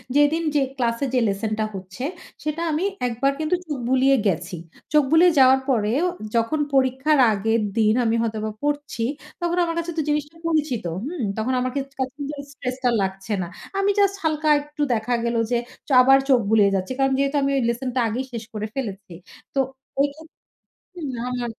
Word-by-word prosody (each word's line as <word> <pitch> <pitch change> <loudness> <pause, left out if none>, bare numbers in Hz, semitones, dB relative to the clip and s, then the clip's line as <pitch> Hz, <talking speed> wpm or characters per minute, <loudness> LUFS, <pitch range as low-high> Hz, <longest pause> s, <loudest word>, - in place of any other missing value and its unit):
যেদিন 295 +3 +4
যে 290 - +4 0.2
ক্লাস 235 -2 0
এ - - +3
যে 255 - +4
লেসন 210 +2 -2
টা 215 - +2
হচ্ছে 190 +6 -7 0.4
সেটা 305 +2 -2
আমি 310 +4 0 0.2
১ 240 - -2
বার 275 - +4
কিন্তু 315 +3 +1
চোখ 295 - -3
বুলিয়ে 265 +1 +4
গেছি। 180 0 -1 0.4
চোখ 300 -1 +6
বুলিয়ে 340 +2 +6
যাওয়ার 260 0 +7
পরেও 240 +6 +2 0.3
যখন 230 +7 +1
পরীক্ষার 265 +3 +3
আগের 225 +2 +1 0.2
দিন 215 -1 +4
আমি 225 0 +2
হয়তোবা 220 -1 -2
পড়ছি 290 -5 -2 0.4
তখন 345 0 0
আমার 335 -1 -2
কাছে 335 +1 -3
তো 315 - +2
জিনিসটা 295 +2 -2
পরিচিত। 305 -7 0 0.2
হুম? 315 -1 -4 0.2
তখন 240 +4 0
আমার 255 0 -1
কা 280 - +1 0.7
স্ট্রেস 255 -2 -4
টা 250 - +3
আর 235 - +1
লাগছে 195 +2 -3
না। 175 - -3 0.3
আমি 395 +1 +3
জাস্ট 395 -1 +3
হালকা 310 -1 0
একটু 295 0 -8
দেখা 230 +2 -1
গেল 235 0 0 0.2
যে 240 - +3 0.3
চ - - -15
আবার 270 +1 +6
চোখ 255 - +6
বুলিয়ে 210 -2 +5
যাচ্ছি। 190 +7 -2
কারণ 270 0 +3
যেহেতু 275 +1 +1
আমি 275 - +1
ঐ - - +3
লেসন 245 +2 -2
টা - - +2
আগেই 245 +4 -2
শেষ 230 -1 -4
করে 215 0 -3
ফেলেছি। 205 -8 -5 0.4
তো 275 - 0 0.4
ঐ - - +6
খেত 320 +1 -13 0.9
না, 235 - -4 0.2
না, 240 - -2
260 Hz, 190 wpm, -23 LUFS, 225-295 Hz, 0.9 s, যাওয়ার